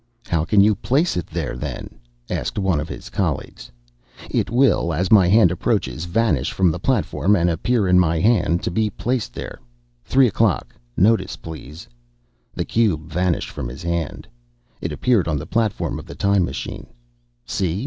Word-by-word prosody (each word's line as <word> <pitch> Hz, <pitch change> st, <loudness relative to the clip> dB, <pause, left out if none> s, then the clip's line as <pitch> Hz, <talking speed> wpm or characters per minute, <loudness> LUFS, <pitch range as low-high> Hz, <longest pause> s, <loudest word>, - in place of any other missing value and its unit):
"How 85 Hz, -2 st, 0 dB
can 100 Hz, +4 st, +4 dB
you 105 Hz, +2 st, +5 dB
place 140 Hz, -, 0 dB
it 90 Hz, -4 st, -3 dB
there, 65 Hz, -, -4 dB
then?" 60 Hz, -, -6 dB, 0.3 s
asked -, -, -3 dB
one 95 Hz, -6 st, +1 dB
of 75 Hz, +2 st, -5 dB
his -, -, -8 dB
colleagues. -, -, -3 dB, 0.6 s
"It -, -, 0 dB
will, 120 Hz, -9 st, +2 dB
as 90 Hz, +4 st, -1 dB
my 100 Hz, -5 st, +7 dB
hand 95 Hz, -2 st, +5 dB
approaches, 80 Hz, -3 st, -1 dB
vanish 85 Hz, -, +1 dB
from 95 Hz, -3 st, +2 dB
the 85 Hz, -, -4 dB
platform 105 Hz, -2 st, +1 dB
and 85 Hz, -2 st, +2 dB
appear 100 Hz, +5 st, 0 dB
in 90 Hz, 0 st, +5 dB
my 85 Hz, -2 st, +2 dB
hand 100 Hz, -4 st, +2 dB
to -, -, -1 dB
be 110 Hz, +4 st, +1 dB
placed 120 Hz, -, -3 dB
there. -, -, -7 dB, 0.4 s
Three 135 Hz, 0 st, +4 dB
o'clock. 100 Hz, -, 0 dB, 0.2 s
Notice, 110 Hz, +4 st, +3 dB
please." 80 Hz, 0 st, -10 dB, 0.7 s
The -, -, -2 dB
cube 100 Hz, -10 st, +1 dB
vanished 90 Hz, +1 st, 0 dB
from -, -, -5 dB
his 65 Hz, +7 st, -9 dB
hand. 85 Hz, -2 st, -3 dB, 0.5 s
It -, -, -3 dB
appeared 115 Hz, -9 st, +1 dB
on 80 Hz, -3 st, 0 dB
the 75 Hz, -, -5 dB
platform 115 Hz, 0 st, -1 dB
of -, -, -11 dB
the -, -, -9 dB
time 100 Hz, -2 st, +2 dB
machine. -, -, -6 dB, 0.6 s
"See? 90 Hz, +3 st, -1 dB
90 Hz, 170 wpm, -21 LUFS, 80-110 Hz, 0.7 s, my